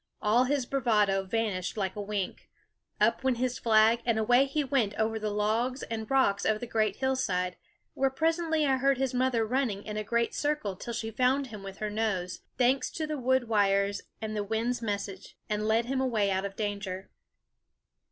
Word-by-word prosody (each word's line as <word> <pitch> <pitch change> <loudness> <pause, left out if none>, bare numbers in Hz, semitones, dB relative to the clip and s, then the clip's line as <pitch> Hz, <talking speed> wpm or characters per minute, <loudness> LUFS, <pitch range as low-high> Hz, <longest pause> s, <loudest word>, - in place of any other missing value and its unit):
All 225 +4 +3
his 275 -1 0
bravado 215 -7 +2
vanished 190 -3 -2
like 190 -2 -2
a 205 - -4
wink. 200 -2 -4 0.5
Up - - +2
went 260 -2 +2
his 250 0 -1
flag, 225 +1 +4
and 230 -2 +1
away 245 +5 +4
he 290 +2 -1
went 255 -7 0
over 220 0 0
the 215 0 -2
logs 220 +6 0
and 220 -1 -5
rocks 265 -7 +2
of 215 -1 +1
the 245 - -4
great 215 -3 0
hillside; 195 -9 0 0.4
where 270 0 +1
presently 320 +2 +1
I 265 -2 +3
heard 275 +1 +2
his 265 -1 -1
mother 250 -3 +1
running 230 -4 -1
in 210 -1 -5
a 215 - -1
great 235 +2 0
circle 290 -10 -1
till 235 +5 -6
she 225 -1 -3
found 255 +4 +2
him 215 -4 -9
with 195 0 -8
her 215 -1 -3
nose, 200 -5 -1 0.2
thanks 255 +2 +2
to 315 - -2
the 305 -2 -3
wood 260 -1 +2
wires 200 -2 +2 0.2
and 215 -1 -4
the 210 - -1
wind's 225 +4 -1
message, 200 -3 -4
and 210 0 -1
led 225 +2 +2
him 265 +1 -1
away 220 -6 +1
out 190 +1 0
of 195 0 -5
danger. 200 -3 -4
225 Hz, 190 wpm, -29 LUFS, 205-260 Hz, 0.5 s, flag